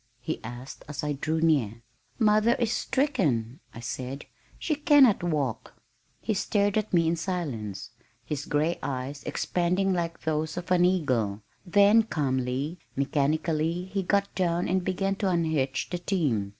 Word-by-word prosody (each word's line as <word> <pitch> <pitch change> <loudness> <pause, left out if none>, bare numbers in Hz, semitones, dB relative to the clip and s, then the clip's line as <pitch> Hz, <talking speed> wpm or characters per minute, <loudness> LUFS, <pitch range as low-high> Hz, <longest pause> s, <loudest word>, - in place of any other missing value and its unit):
he 125 - -4
asked 120 +3 -8
as 145 -1 -5
I 150 0 0
drew 155 +3 -1
near. 120 -9 +1 0.3
"Mother 215 +1 +4
is 235 -3 0
stricken," 155 - 0
I 115 - -10
said. 130 +3 -5 0.3
"She 315 - -1
cannot 290 - +5
walk." 145 -9 -2 0.4
He 220 - -1
stared 205 0 +1
at 215 -1 0
me 170 -2 +3
in 165 - +2
silence, 135 - -4 0.3
his 145 +2 -4
gray 155 +4 0
eyes 135 +1 -4
expanding 180 +2 0
like 170 -2 -2
those 155 +1 -2
of 175 0 -5
an 180 -1 +5
eagle, 125 - 0 0.2
then 205 +4 +6
calmly, 140 - -2 0.2
mechanically 155 +5 0
he 195 - +1
got 200 +2 0
down 175 -2 0
and 185 0 +1
began 195 +1 -1
to 195 -2 0
unhitch 160 -7 0
the 175 - -2
team. 145 - 0
165 Hz, 150 wpm, -27 LUFS, 135-190 Hz, 0.4 s, then